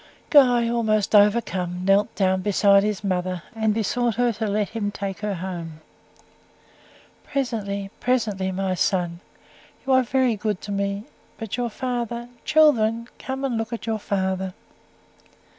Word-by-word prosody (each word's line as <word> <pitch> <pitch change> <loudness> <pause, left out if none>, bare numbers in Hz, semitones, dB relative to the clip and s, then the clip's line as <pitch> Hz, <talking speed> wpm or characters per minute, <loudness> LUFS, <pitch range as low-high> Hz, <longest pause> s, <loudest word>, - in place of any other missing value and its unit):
Guy, 245 -5 +6
altogether 215 -3 +3
overcome, 185 -5 -2
knelt 200 +3 +3
down 190 -1 +1
beside 200 0 +4
his 210 0 -2
mother, 185 -2 -2
and 220 -1 +1
besought 225 +2 0
her 245 -1 +2
to 220 +1 -3
let 205 -1 0
him 220 -2 -2
take 200 -1 -5
her 205 -1 -2
home. 170 -3 -6 1.4
"Presently 200 -7 -3
presently, 215 -7 0
my 190 0 -1
son. 175 -1 0 0.7
You 265 - +2
are 260 - +6
very 255 -1 +1
good 210 -2 -2
to 205 - -6
me; 200 0 -2 0.3
but 225 -3 -4
your 245 -1 -1
father. 240 0 -4 0.2
Children, 235 -7 +3
come 265 0 -4
in 270 - -1
and 235 - -1
look 225 -1 -4
at 230 - -5
your 220 -1 -1
father." 190 -2 -2
210 Hz, 145 wpm, -23 LUFS, 195-235 Hz, 1.4 s, Guy